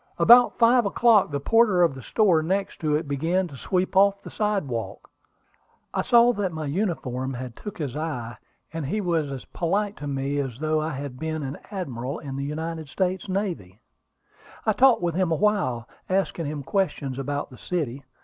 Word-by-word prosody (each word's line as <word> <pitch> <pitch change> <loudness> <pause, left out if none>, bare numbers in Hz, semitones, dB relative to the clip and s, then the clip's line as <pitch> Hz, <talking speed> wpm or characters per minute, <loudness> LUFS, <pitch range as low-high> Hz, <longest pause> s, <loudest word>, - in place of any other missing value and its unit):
About 245 +1 +7
five 240 -1 +5
o'clock 220 -2 +4
the 140 -1 -2
porter 210 +2 +4
of 165 - +3
the 135 - -9
store 180 - +3
next 190 +5 -2
to 150 -2 +1
it 155 0 -2
began 165 +7 0
to 145 - -11
sweep 185 +7 -1
off 200 +1 +4
the - - -9
sidewalk. 190 - -3 0.8
I - - +1
saw 240 0 +5
that 205 -4 -2
my 155 -1 -5
uniform 135 - -2 0.2
took 210 - -8
his 145 -6 -4
eye, 125 -7 -4 0.4
and 160 -4 -3
he 210 +9 -1
was 165 -6 0
as 135 -2 -6
polite 200 +4 -1
to 145 - -6
me 140 +1 -2
as 130 -4 -3
though 155 +1 0
I 155 +1 -3
had 135 -1 -6
been 160 0 -3
an 135 +1 -5
admiral 140 - -4
in 135 -3 -7
the 135 - -3
United 160 +1 -4
States 185 +1 -2
Navy. 175 - -3 0.9
I 215 - +3
talked 250 -4 +4
with 170 -1 0
him 180 0 0
awhile, 160 - +1 0.2
asking 185 -4 0
him 145 -1 -4
questions 140 -7 -1
about 145 +1 -3
the 125 - -12
city. 140 -7 -3
160 Hz, 180 wpm, -25 LUFS, 140-195 Hz, 0.9 s, About